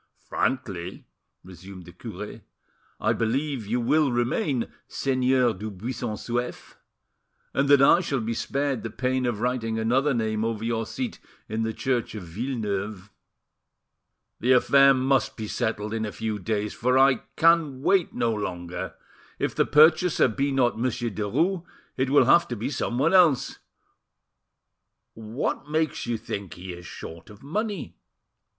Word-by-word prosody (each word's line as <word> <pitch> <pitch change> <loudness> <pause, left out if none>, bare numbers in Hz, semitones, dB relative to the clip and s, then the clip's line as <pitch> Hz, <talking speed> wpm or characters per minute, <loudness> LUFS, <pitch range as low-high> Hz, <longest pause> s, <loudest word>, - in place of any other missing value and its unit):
"Frankly," 95 -9 -2 0.4
resumed 95 0 -11
the 85 - -11
cure, 90 - -8 0.6
"I - - +2
believe 130 0 -1
you 120 +4 0
will 145 +4 +2
remain 120 - 0 0.2
Seigneur 130 -2 +1
du 105 +3 -6
Buisson 110 +3 -4
Souef, 120 +2 -4 0.8
and 140 +1 +1
that 140 -1 +7
I 170 - +7
shall 145 -7 -1
be 115 +1 -2
spared 140 +1 -1
the 115 - -5
pain 130 +2 -1
of 110 -3 -2
writing 120 -2 -1
another 130 +5 +2
name 110 -1 -1
over 115 -1 -2
your 115 -1 -1
seat 250 -4 -4 0.3
in 110 +1 -2
the 110 0 0
church 120 0 -2
of 105 - -6
Villeneuve." 105 -1 -4 1.3
"The 125 +2 +4
affair 135 +2 +6
must 135 +1 +1
be 110 -2 -4
settled 105 0 -2
in 110 -1 -1
a 105 - -3
few 110 -1 -3
days, 105 +1 -2
for 125 +2 +1
I 135 0 +5
can 160 -5 +3
wait 190 -1 +3
no 115 -1 0
longer; 90 -4 -5 0.4
if - - -1
the - - +1
purchaser 155 +2 +5
be 135 +4 -1
not 125 -4 +1
Monsieur 120 -1 -1
Derues, 165 - 0 0.3
it 130 0 0
will 145 - +5
have 170 0 +5
to 120 - -4
be 115 +5 -3
someone 135 +5 0
else. 170 -9 +4 1.5
What 115 +6 -4
makes 155 -5 -1
you 120 -1 0
think 100 -4 -6
he 90 +1 -7
is 85 0 -10
short 80 0 -9
of 105 +2 -14
money?" 205 +8 -3
120 Hz, 150 wpm, -25 LUFS, 110-135 Hz, 1.5 s, that